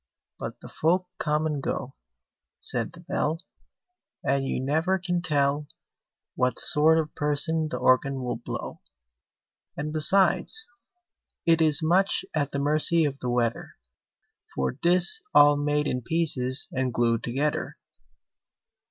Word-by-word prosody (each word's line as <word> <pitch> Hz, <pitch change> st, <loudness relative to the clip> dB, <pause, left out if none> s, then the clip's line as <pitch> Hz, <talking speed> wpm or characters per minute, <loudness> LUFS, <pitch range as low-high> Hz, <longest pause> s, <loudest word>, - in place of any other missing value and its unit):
But -, -, -8 dB
the -, -, -11 dB
folk 180 Hz, +3 st, -1 dB
come 150 Hz, 0 st, -1 dB
and 150 Hz, -3 st, -3 dB
go, -, -, -5 dB, 0.7 s
Said -, -, -3 dB
the -, -, -13 dB
Bell, 155 Hz, +2 st, -2 dB, 0.9 s
And 135 Hz, -1 st, -1 dB
you -, -, -3 dB
never 160 Hz, +8 st, -1 dB
can 175 Hz, -1 st, -3 dB
tell 145 Hz, -3 st, -1 dB, 0.7 s
What 125 Hz, -1 st, -1 dB
sort 155 Hz, +2 st, +5 dB
of 155 Hz, -1 st, -3 dB
person 150 Hz, +2 st, 0 dB
the -, -, -4 dB
Organ 130 Hz, +1 st, +1 dB
will 125 Hz, -, -4 dB
blow! -, -, -8 dB, 1.0 s
And, 150 Hz, +1 st, -5 dB
besides, 195 Hz, -, +3 dB, 0.8 s
it 165 Hz, -1 st, +3 dB
is 155 Hz, -1 st, +4 dB
much 180 Hz, +5 st, +1 dB
at 145 Hz, -3 st, -1 dB
the -, -, -4 dB
mercy 155 Hz, +3 st, +2 dB
of 140 Hz, -1 st, -4 dB
the 125 Hz, -, -4 dB
weather 120 Hz, -1 st, -2 dB, 0.8 s
For 65 Hz, -1 st, -1 dB
'tis 175 Hz, -, +3 dB
all 145 Hz, 0 st, +6 dB
made 150 Hz, +1 st, -1 dB
in 125 Hz, -3 st, -3 dB
pieces 130 Hz, -3 st, +3 dB
and 130 Hz, -1 st, -2 dB
glued 115 Hz, -1 st, -1 dB
together! 140 Hz, +5 st, -3 dB
150 Hz, 135 wpm, -25 LUFS, 135-160 Hz, 1.0 s, all